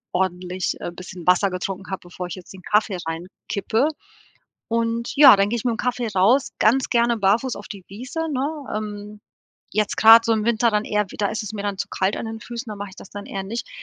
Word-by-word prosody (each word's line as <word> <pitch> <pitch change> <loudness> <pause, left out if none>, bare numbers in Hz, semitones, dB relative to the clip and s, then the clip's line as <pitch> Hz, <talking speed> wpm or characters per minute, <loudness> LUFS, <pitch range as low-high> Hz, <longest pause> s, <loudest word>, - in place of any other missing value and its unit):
ordentlich, 180 0 -1
äh, - - -5
bisschen 180 0 -10
Wasser 180 +2 +4
getrunken 190 +1 -5
habe, 190 - -4
bevor 180 0 -7
ich 175 - -6
jetzt 185 0 -12
den 190 - -12
Kaffee 210 0 +1
reinkippe. 195 - -2 0.8
Und 230 0 -1
ja, 280 -7 +10
dann 200 +1 +2
gehe 235 - -1
ich - - -6
mit 245 - +2
dem - - -3
Kaffee 245 0 -1
raus, 225 +9 +4
ganz 250 +4 +3
gerne 235 -1 +3
barfuß 220 +6 +2
auf - - -10
die 195 -3 -9
Wiese, 250 - -6
ne? 285 +2 -3
Ähm, 210 0 -6 0.5
jetzt 210 0 0
grad 225 +1 +8
so 230 - +2
im 215 -1 0
Winter 235 0 +2
dann 210 0 +1
eher 210 -2 0
wieder 205 -2 -1
ist 220 - -3
es 210 - -6
mir 205 -2 -5
dann 200 -1 -3
zu 200 - -2
kalt 190 +1 0
an - - -4
den 225 0 -6
Füßen, 235 0 -7
dann 210 - -7
mache 205 0 -5
ich 185 - -16
das - - -12
dann 205 0 -8
eher 195 -1 -5
nicht. 230 +5 -5
210 Hz, 230 wpm, -22 LUFS, 190-230 Hz, 0.8 s, ja